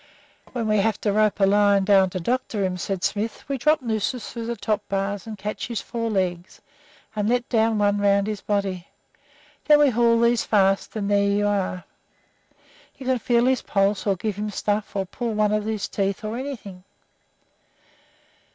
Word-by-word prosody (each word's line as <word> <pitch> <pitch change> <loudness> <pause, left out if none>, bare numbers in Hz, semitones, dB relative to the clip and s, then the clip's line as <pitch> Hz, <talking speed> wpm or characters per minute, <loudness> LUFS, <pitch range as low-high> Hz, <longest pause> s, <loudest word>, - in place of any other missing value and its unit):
"When 235 -3 -2
we 215 0 +2
have 220 +2 +1
to 205 - 0
rope 215 0 +2
a 195 - +5
lion 200 0 +3
down 195 -1 +5
to 185 - -4
doctor 215 0 -1
him," 185 -1 -2
said 185 +1 -4
Smith, 215 +2 -2
"we 275 -1 -2
drop 305 +2 +2
nooses 225 +1 -2
through 230 -1 -6
the 235 - -2
top 215 -1 -1
bars 200 +1 -2
and 215 -1 -6
catch 210 +2 -4
his 235 -2 -3
four 230 -1 -4
legs, 185 -3 -2 0.6
and 210 0 0
let 245 +1 +1
down 225 -2 +2
one 205 0 +2
around 200 0 +3
his 210 -1 -4
body. 195 -4 -2 0.8
Then 300 -1 +7
we 295 -2 +4
haul 235 0 +3
these 235 0 +3
fast, 195 -1 +1
and 205 -2 -2
there 200 0 +3
you 205 +1 +1
are. 195 -3 -1 1.1
You 270 - -10
can 255 -1 +1
feel 235 +1 +2
his 260 -1 +2
pulse 200 +1 0
or 195 - +3
give 205 +2 -4
him 210 +1 -3
stuff 205 0 -2
or 195 -1 0
pull 235 +5 -4
out - - -4
one 210 -1 +2
of 215 0 0
his 220 -2 -2
teeth 195 +1 -2
or 215 +1 -3
anything." 235 -9 -7
210 Hz, 190 wpm, -23 LUFS, 200-230 Hz, 1.1 s, Then